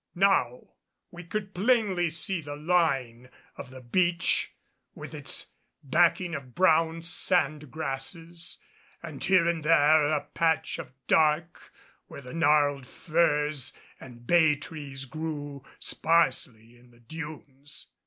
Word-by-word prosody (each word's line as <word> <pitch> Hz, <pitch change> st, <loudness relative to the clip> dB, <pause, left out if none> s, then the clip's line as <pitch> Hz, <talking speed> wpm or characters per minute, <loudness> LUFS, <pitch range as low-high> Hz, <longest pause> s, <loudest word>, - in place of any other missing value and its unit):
Now 175 Hz, -10 st, +1 dB, 0.4 s
we 175 Hz, 0 st, -10 dB
could 200 Hz, +3 st, -5 dB
plainly 195 Hz, -4 st, +2 dB
see 170 Hz, +2 st, -2 dB
the 145 Hz, -1 st, -7 dB
line 140 Hz, -7 st, 0 dB, 0.3 s
of -, -, -9 dB
the 130 Hz, 0 st, -11 dB
beach 170 Hz, +7 st, +1 dB, 0.4 s
with -, -, -9 dB
its -, -, -1 dB, 0.3 s
backing 170 Hz, +4 st, +2 dB
of 130 Hz, -5 st, -7 dB
brown 165 Hz, -2 st, +3 dB
sand 155 Hz, -4 st, 0 dB
grasses 165 Hz, +4 st, -5 dB, 0.5 s
and 155 Hz, -5 st, -7 dB
here 185 Hz, -3 st, +4 dB
and 170 Hz, -2 st, -1 dB
there 150 Hz, -1 st, +5 dB
a 150 Hz, -1 st, +1 dB
patch 160 Hz, +2 st, -1 dB
of -, -, -8 dB
dark 160 Hz, +2 st, +1 dB, 0.4 s
where -, -, -10 dB
the 125 Hz, -2 st, -10 dB
gnarled 145 Hz, -4 st, +2 dB
firs 150 Hz, -4 st, 0 dB, 0.3 s
and 120 Hz, -2 st, -13 dB
bay 160 Hz, 0 st, +4 dB
trees 145 Hz, -3 st, -6 dB
grew 145 Hz, -1 st, -6 dB
sparsely 125 Hz, -8 st, 0 dB
in 125 Hz, 0 st, -21 dB
the 120 Hz, -1 st, -22 dB
dunes. 145 Hz, 0 st, -9 dB
155 Hz, 125 wpm, -27 LUFS, 140-170 Hz, 0.5 s, there